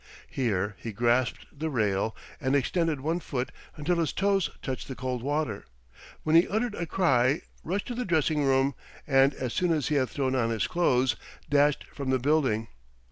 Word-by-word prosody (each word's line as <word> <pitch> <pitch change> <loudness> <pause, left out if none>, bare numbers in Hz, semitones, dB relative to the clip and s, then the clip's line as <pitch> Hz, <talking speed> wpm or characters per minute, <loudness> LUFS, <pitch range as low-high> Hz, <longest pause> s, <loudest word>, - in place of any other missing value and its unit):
Here 105 -6 0
he 115 - -5
grasped 120 +3 +1
the 160 +1 -1
rail 110 -4 0 0.2
and 130 +2 +1
extended 155 +1 +1
one 165 +5 0
foot 130 -6 -3 0.3
until 165 +4 0
his 165 -2 0
toes 195 -4 +2
touched 130 -2 -4
the 130 - -6
cold 125 -1 -3
water, 140 - -2 0.6
when 155 +1 +2
he 170 - +7
uttered 220 +2 -1
a 170 -4 -4
cry, 135 -6 +2 0.2
rushed 195 +5 -2
to - - -2
the 250 +1 -2
dressing 155 - +1
room, 135 0 +3 0.3
and, 135 -1 +4
as 125 -3 -3
soon 180 +4 +1
as 155 -4 +1
he 150 - +1
had 130 - -1
thrown 130 -2 -1
on 120 -3 +1
his 115 -1 0
clothes, 130 -7 +2 0.4
dashed 145 0 +3
from 140 -2 -4
the 130 - +3
building. 130 -5 +1
140 Hz, 185 wpm, -28 LUFS, 125-160 Hz, 0.6 s, he